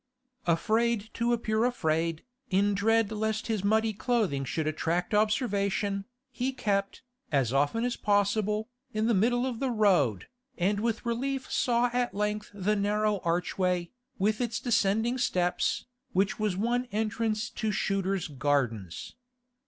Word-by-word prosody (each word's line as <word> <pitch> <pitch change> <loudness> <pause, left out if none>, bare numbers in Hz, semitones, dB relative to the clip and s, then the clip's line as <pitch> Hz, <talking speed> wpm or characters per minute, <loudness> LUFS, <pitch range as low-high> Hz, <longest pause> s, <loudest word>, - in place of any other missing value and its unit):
Afraid 220 +5 +1
to 235 +1 0
appear 220 -2 +1
afraid, 165 -9 0 0.3
in 200 +2 +2
dread 220 +1 +2
lest 220 0 -1
his 220 -4 -1
muddy 220 +2 +2
clothing 210 - 0
should 155 +4 -2
attract 165 +5 -1
observation, 205 -2 +1 0.3
he 260 +1 -1
kept, 200 -3 -1 0.3
as 135 -5 +1
often 145 - +2
as 245 - -1
possible, 210 +1 +1 0.3
the 220 +2 +1
middle 245 +5 +2
of 250 -3 -3
the 270 - 0
road, 185 - +2 0.3
and 200 +3 +1
with 225 +1 -1
relief 260 +3 -2
saw 240 0 +2
at 245 -3 0
length 210 +1 -1
the 205 +1 0
narrow 210 0 +1
archway, 180 +1 0 0.3
with 215 +4 +1
its 240 -2 -1
descending 225 +1 +1
steps, 180 -6 0 0.3
which 195 +3 +1
was 210 -4 0
one 240 +4 0
entrance 215 0 -1
to 220 -1 -2
Shooter's 195 -2 0
Gardens. 130 - -1
210 Hz, 135 wpm, -29 LUFS, 185-225 Hz, 0.3 s, in